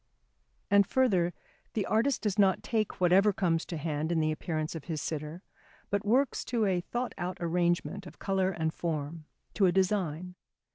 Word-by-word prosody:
And 200 Hz, -1 st, +5 dB
further, 190 Hz, -10 st, +2 dB, 0.4 s
the 210 Hz, -, 0 dB
artist 240 Hz, +5 st, +1 dB
does 210 Hz, -1 st, 0 dB
not 195 Hz, -2 st, +4 dB
take 220 Hz, -3 st, -1 dB
whatever 185 Hz, +3 st, +5 dB
comes 170 Hz, -4 st, 0 dB
to 170 Hz, -, -4 dB
hand 155 Hz, +1 st, -2 dB
in 170 Hz, -, +2 dB
the 155 Hz, 0 st, +1 dB
appearance 155 Hz, 0 st, -3 dB
of 165 Hz, -3 st, -7 dB
his 160 Hz, -3 st, -3 dB
sitter, 155 Hz, +4 st, -5 dB, 0.5 s
but 200 Hz, +1 st, 0 dB
works 250 Hz, +6 st, +2 dB
to 230 Hz, -3 st, 0 dB
a 185 Hz, -3 st, +1 dB
thought 240 Hz, +7 st, -3 dB
out 180 Hz, +1 st, -3 dB
arrangement 175 Hz, +3 st, 0 dB
of -, -, -13 dB
colour 190 Hz, -1 st, 0 dB
and 160 Hz, -3 st, -2 dB
form, 155 Hz, -1 st, -4 dB, 0.3 s
to 195 Hz, -, +4 dB
a -, -, +4 dB
design. 180 Hz, -2 st, 0 dB
180 Hz, 175 wpm, -30 LUFS, 165-200 Hz, 0.5 s, And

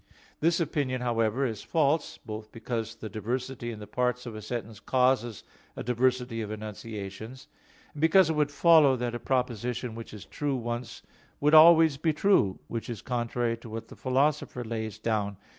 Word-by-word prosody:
This 170 Hz, +2 st, +2 dB
opinion, 140 Hz, -6 st, -1 dB
however, 120 Hz, +1 st, +1 dB
is 110 Hz, -5 st, -3 dB
false; 155 Hz, -1 st, 0 dB
both 110 Hz, 0 st, -8 dB
because 115 Hz, 0 st, -4 dB
the 110 Hz, -1 st, -7 dB
diversity 120 Hz, +3 st, -4 dB
in 115 Hz, -, -6 dB
the 105 Hz, -, -8 dB
parts 125 Hz, +2 st, -1 dB
of 120 Hz, -, -6 dB
a 110 Hz, -, -7 dB
sentence 110 Hz, -1 st, -5 dB
causes 125 Hz, -2 st, +1 dB, 0.3 s
a -, -, -5 dB
diversity 125 Hz, 0 st, 0 dB
of 105 Hz, -, -5 dB
enunciations; 110 Hz, +2 st, -7 dB, 0.5 s
and 150 Hz, -, -8 dB
because 165 Hz, +3 st, +6 dB
it 160 Hz, -, 0 dB
would 150 Hz, -1 st, +2 dB
follow 150 Hz, -2 st, +5 dB
that 120 Hz, -1 st, -3 dB
a 120 Hz, -, -3 dB
proposition 125 Hz, -2 st, -2 dB
which 115 Hz, 0 st, -8 dB
is 105 Hz, -2 st, -10 dB
true 145 Hz, -3 st, -2 dB
once 120 Hz, 0 st, -5 dB, 0.4 s
would 150 Hz, +1 st, +3 dB
be 155 Hz, -, +9 dB
always 160 Hz, -2 st, +7 dB
true; 155 Hz, -, +2 dB
which 115 Hz, 0 st, -5 dB
is 115 Hz, -4 st, -6 dB
contrary 120 Hz, -1 st, -1 dB
to 115 Hz, 0 st, -12 dB
what 115 Hz, +1 st, -7 dB
the -, -, -11 dB
Philosopher 135 Hz, -1 st, 0 dB
lays 110 Hz, -2 st, -4 dB
down 110 Hz, -2 st, -1 dB
(Categor. 100 Hz, -, -31 dB
120 Hz, 175 wpm, -28 LUFS, 110-135 Hz, 0.5 s, be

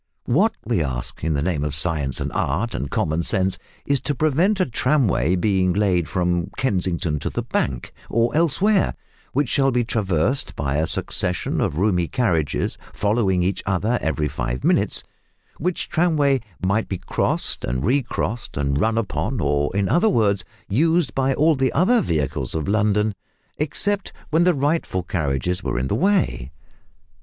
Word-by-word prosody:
What, -, -, +2 dB
we -, -, +1 dB
ask, -, -, -4 dB
in 80 Hz, -1 st, 0 dB
the 70 Hz, -, 0 dB
name 80 Hz, -4 st, -1 dB
of 75 Hz, -2 st, -2 dB
science 75 Hz, -3 st, 0 dB
and -, -, -3 dB
art 95 Hz, -, -1 dB
and 65 Hz, +3 st, -3 dB
common 80 Hz, +2 st, 0 dB
sense, 95 Hz, +3 st, +1 dB, 0.3 s
is 140 Hz, -2 st, +1 dB
to 145 Hz, -, -2 dB
prevent 160 Hz, +9 st, +2 dB
a 185 Hz, -, +3 dB
tramway 115 Hz, -, +1 dB
being 95 Hz, -1 st, +1 dB
laid 90 Hz, -4 st, +1 dB
from 90 Hz, -1 st, 0 dB
Kensington 90 Hz, -, 0 dB
to -, -, -3 dB
the -, -, -3 dB
Bank, 65 Hz, -2 st, -2 dB, 0.2 s
"or 115 Hz, +3 st, +1 dB
elsewhere," 185 Hz, +6 st, +2 dB, 0.4 s
which 145 Hz, +1 st, +1 dB
shall 135 Hz, +2 st, +2 dB
be 125 Hz, -2 st, +1 dB
traversed 110 Hz, -, 0 dB
by 70 Hz, 0 st, -1 dB
a 80 Hz, +1 st, +1 dB
succession 90 Hz, +3 st, +1 dB
of 75 Hz, -, -1 dB
roomy 90 Hz, -3 st, +1 dB
carriages 85 Hz, -, 0 dB
following 100 Hz, -4 st, +1 dB
each 95 Hz, +2 st, -1 dB
other 105 Hz, +6 st, +1 dB
every 80 Hz, -1 st, 0 dB
five 65 Hz, -3 st, -3 dB
minutes; -, -, +1 dB, 0.6 s
which 180 Hz, +2 st, -1 dB
tramway 150 Hz, -5 st, +2 dB, 0.2 s
might 105 Hz, +4 st, 0 dB
be 95 Hz, -, -2 dB
crossed -, -, -1 dB
and 65 Hz, +3 st, -2 dB
recrossed 120 Hz, -, -1 dB
and 70 Hz, 0 st, 0 dB
run 110 Hz, 0 st, +1 dB
upon, 115 Hz, +2 st, -2 dB
or, 70 Hz, -2 st, +1 dB
in 100 Hz, -1 st, +1 dB
other 175 Hz, -, +3 dB
words, 100 Hz, -, +2 dB, 0.2 s
used 160 Hz, -, +2 dB
by 135 Hz, 0 st, +1 dB
all 160 Hz, +2 st, +4 dB
the 130 Hz, -1 st, +1 dB
other 230 Hz, +7 st, +3 dB
vehicles 75 Hz, -, -1 dB
of 80 Hz, -2 st, -2 dB
London 105 Hz, 0 st, +2 dB, 0.5 s
except 200 Hz, +7 st, -1 dB, 0.2 s
when 165 Hz, +2 st, +3 dB
the 180 Hz, -2 st, +4 dB
rightful 145 Hz, -, 0 dB
carriages 85 Hz, +2 st, -1 dB
were -, -, -2 dB
in 65 Hz, -, 0 dB
the -, -, -1 dB
way? 190 Hz, -, +1 dB
100 Hz, 165 wpm, -22 LUFS, -, 0.6 s, all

